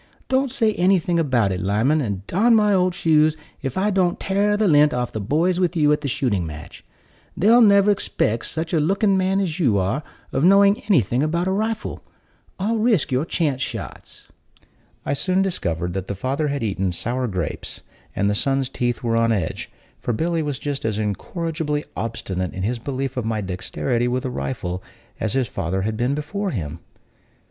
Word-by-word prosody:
Don't 265 Hz, +1 st, +2 dB
say 225 Hz, -4 st, +1 dB
anything 180 Hz, -2 st, +2 dB
about 125 Hz, -10 st, +2 dB
it, 90 Hz, -, -2 dB
Lyman, 110 Hz, -, +2 dB
and 100 Hz, -6 st, -3 dB
darn 225 Hz, -, +3 dB
my 210 Hz, -2 st, +4 dB
old 180 Hz, -1 st, +2 dB
shoes, 155 Hz, -1 st, +3 dB, 0.2 s
if 135 Hz, -3 st, -4 dB
I 205 Hz, +2 st, +2 dB
don't 185 Hz, -2 st, +1 dB
tare 205 Hz, +2 st, +1 dB
the 215 Hz, -1 st, +2 dB
lint 150 Hz, -4 st, +5 dB
off 125 Hz, -1 st, -2 dB
the 110 Hz, -, -4 dB
boys 165 Hz, -, +1 dB
with 180 Hz, -1 st, +1 dB
you 150 Hz, -2 st, +4 dB
at 150 Hz, -, -1 dB
the 145 Hz, -, -3 dB
shooting 120 Hz, -8 st, 0 dB
match. 80 Hz, -2 st, -9 dB, 0.5 s
They'll 230 Hz, +6 st, +5 dB
never 200 Hz, -1 st, +6 dB
'spect 115 Hz, -, -1 dB
such 160 Hz, +2 st, -3 dB
a 165 Hz, -, +3 dB
looking 195 Hz, +5 st, +2 dB
man 190 Hz, +1 st, +1 dB
as 180 Hz, -3 st, -2 dB
you 120 Hz, -, +3 dB
are 100 Hz, +10 st, 0 dB, 0.3 s
of 135 Hz, -, 0 dB
knowing 200 Hz, +3 st, +5 dB
anything 125 Hz, -, +3 dB
about 170 Hz, +4 st, 0 dB
a -, -, +1 dB
rifle. 220 Hz, +3 st, -2 dB, 0.5 s
I'll 220 Hz, +4 st, 0 dB
risk 215 Hz, -, +2 dB
your 130 Hz, +4 st, +1 dB
chance 145 Hz, -7 st, -1 dB
shots." -, -, -6 dB, 0.8 s
I -, -, 0 dB
soon 185 Hz, +6 st, +1 dB
discovered 85 Hz, -, -2 dB
that 95 Hz, 0 st, -4 dB
the 100 Hz, -, -3 dB
father 135 Hz, +9 st, -1 dB
had 140 Hz, -3 st, -2 dB
eaten 95 Hz, -3 st, -1 dB
sour 125 Hz, +8 st, -2 dB
grapes, 90 Hz, -7 st, -4 dB, 0.3 s
and 100 Hz, -, +1 dB
the 105 Hz, -, +2 dB
son's 135 Hz, +4 st, 0 dB
teeth 120 Hz, -2 st, -2 dB
were 115 Hz, -1 st, +1 dB
on 115 Hz, 0 st, +3 dB
edge; 95 Hz, -8 st, -2 dB, 0.3 s
for 120 Hz, -, -2 dB
Billy 165 Hz, +7 st, 0 dB
was 145 Hz, -3 st, -2 dB
just 145 Hz, 0 st, -4 dB
as 110 Hz, -2 st, -1 dB
incorrigibly 150 Hz, -, -2 dB
obstinate 95 Hz, -5 st, -3 dB
in 95 Hz, -, -4 dB
his 120 Hz, +4 st, -1 dB
belief 135 Hz, +1 st, -4 dB
of 125 Hz, -, 0 dB
my 110 Hz, -1 st, -1 dB
dexterity 105 Hz, +6 st, -2 dB
with 125 Hz, +1 st, -1 dB
a 130 Hz, -, -2 dB
rifle 95 Hz, -9 st, -4 dB, 0.4 s
as 110 Hz, -, -1 dB
his 130 Hz, -2 st, +1 dB
father 95 Hz, -1 st, -2 dB
had 110 Hz, +1 st, -1 dB
been 125 Hz, +5 st, 0 dB
before 195 Hz, +7 st, -3 dB
him. 80 Hz, -, -4 dB
140 Hz, 190 wpm, -22 LUFS, 110-185 Hz, 0.8 s, never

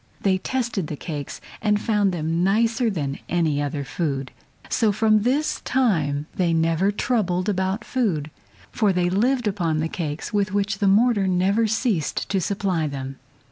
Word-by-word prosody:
They 190 Hz, -2 st, +2 dB
tasted 235 Hz, -7 st, -2 dB
the 150 Hz, -, -4 dB
cakes 145 Hz, -2 st, -6 dB, 0.2 s
and 210 Hz, -1 st, +2 dB
found 210 Hz, -3 st, +1 dB
them 165 Hz, 0 st, -1 dB
nicer 225 Hz, +5 st, +2 dB
than 145 Hz, -8 st, -3 dB
any 160 Hz, -4 st, +1 dB
other 145 Hz, 0 st, -2 dB
food. 135 Hz, -2 st, -3 dB, 0.4 s
So 220 Hz, -3 st, +2 dB
from 215 Hz, +1 st, +3 dB
this 290 Hz, +7 st, 0 dB
time 155 Hz, -, +1 dB
they 175 Hz, -3 st, +1 dB
never 165 Hz, +4 st, +2 dB
troubled 200 Hz, -5 st, 0 dB
about 190 Hz, +1 st, -1 dB
food, 170 Hz, -, -1 dB, 0.4 s
for 210 Hz, -2 st, +2 dB
they 180 Hz, -1 st, +1 dB
lived 240 Hz, +4 st, +1 dB
upon 175 Hz, -6 st, 0 dB
the 160 Hz, -, 0 dB
cakes 160 Hz, +3 st, -4 dB
with 200 Hz, -1 st, 0 dB
which 200 Hz, 0 st, 0 dB
the 200 Hz, -, +2 dB
mortar 205 Hz, 0 st, +4 dB
never 190 Hz, +5 st, +2 dB
ceased 215 Hz, -, -1 dB
to 195 Hz, -2 st, +1 dB
supply 185 Hz, -4 st, -1 dB
them. 135 Hz, -1 st, -6 dB
190 Hz, 160 wpm, -23 LUFS, 160-215 Hz, 0.4 s, mortar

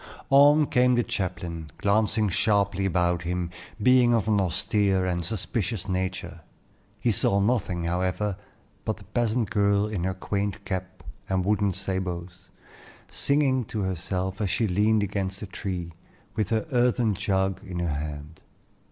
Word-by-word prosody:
On 145 Hz, +2 st, +7 dB
came 125 Hz, -2 st, +3 dB
the 120 Hz, -, +2 dB
chaplain, 90 Hz, -5 st, -4 dB
glancing 110 Hz, +1 st, +2 dB
sharply 100 Hz, 0 st, +1 dB
about 90 Hz, -1 st, +1 dB
him, 90 Hz, 0 st, -2 dB, 0.3 s
being 120 Hz, +1 st, +5 dB
of 110 Hz, -2 st, 0 dB
an 105 Hz, -2 st, +3 dB
austere 95 Hz, +1 st, +1 dB
and 90 Hz, -1 st, -1 dB
suspicious 105 Hz, +1 st, -2 dB
nature. 95 Hz, -3 st, -3 dB, 0.6 s
He 115 Hz, +3 st, +2 dB
saw 100 Hz, 0 st, +4 dB
nothing, 100 Hz, -5 st, 0 dB
however, 90 Hz, +4 st, -1 dB, 0.5 s
but -, -, -2 dB
the -, -, -14 dB
peasant 115 Hz, -2 st, -1 dB
girl 100 Hz, 0 st, +3 dB
in 105 Hz, -5 st, -3 dB
her 95 Hz, 0 st, -1 dB
quaint 100 Hz, 0 st, -3 dB
cap 95 Hz, -1 st, -5 dB, 0.3 s
and 95 Hz, -1 st, 0 dB
wooden 105 Hz, -1 st, +2 dB
sabots, 90 Hz, -1 st, -4 dB, 0.6 s
singing 140 Hz, -3 st, +2 dB
to 110 Hz, -1 st, -4 dB
herself 95 Hz, +2 st, -2 dB
as 100 Hz, -, 0 dB
she 110 Hz, +4 st, +1 dB
leaned 105 Hz, +3 st, +2 dB
against 100 Hz, 0 st, -3 dB
a -, -, -3 dB
tree, 90 Hz, -3 st, -5 dB, 0.4 s
with 105 Hz, -3 st, -1 dB
her 110 Hz, +4 st, 0 dB
earthen 120 Hz, -3 st, +2 dB
jug 95 Hz, -1 st, -1 dB
in 95 Hz, -2 st, -6 dB
her 85 Hz, -3 st, -1 dB
hand. 75 Hz, +1 st, -6 dB
100 Hz, 145 wpm, -26 LUFS, 90-110 Hz, 0.6 s, On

